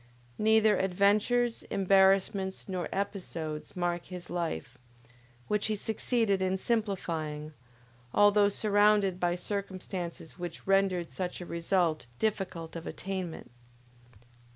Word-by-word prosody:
Neither 220 -1 +4
adventures, 205 +6 +2
embarrassments, 190 0 +3
nor 185 -3 -3
episodes, 175 -6 -4
mark 175 -1 -1
his 180 -2 -8
life, 130 - -3 0.7
which 210 0 +1
he 215 - 0
succeeded 220 -1 0
in 190 0 +1
simplifying, 165 -9 -2 0.6
although 205 0 +5
surrounded 205 -2 +3
by 175 -1 +1
circumstances 185 -3 -5
which 175 -2 -6
rendered 195 -3 +2
such 180 -1 -4
a 175 - -6
result 170 -4 0
difficult 180 - -2
of 165 - -6
attainment. 185 -8 -5
190 Hz, 105 wpm, -30 LUFS, 175-205 Hz, 0.7 s, although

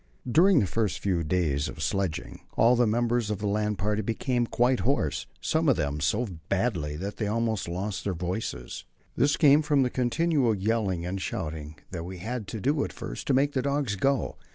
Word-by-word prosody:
During 170 +6 +5
the - - +2
first 105 +1 -1
few 90 -4 0
days 75 -4 0
of 80 - -6
sledging 95 -1 -2 0.2
all 120 +2 +5
the 120 -1 +3
members 120 0 +1
of 105 - -1
the 105 - -5
land 105 0 0
party 105 +2 0
became 120 +3 -1
quite 125 +2 +2
hoarse, 75 - 0
some 160 -1 +1
of 135 - +5
them 75 -1 -1
so 95 +11 +1 0.2
badly 95 -8 0
that 100 +5 -5
they 105 - -1
almost 110 -2 -1
lost 95 +4 -3
their 95 -3 -2
voices. 90 - -4 0.3
This 140 +2 +2
came 145 0 +6
from 145 -3 +3
the 125 - -1
continual 130 -1 +1
yelling 100 -4 0
and 95 +2 -3
shouting 75 -2 -4 0.2
that 85 -3 -4
we 90 +2 -7
had 110 +3 -4
to 110 - -5
do 140 +6 +1
at - - -4
first - - -7
to 135 - +3
make 140 +2 +3
the 130 - +1
dogs 140 -5 0
go. 135 +5 0
105 Hz, 200 wpm, -27 LUFS, 90-125 Hz, 0.3 s, came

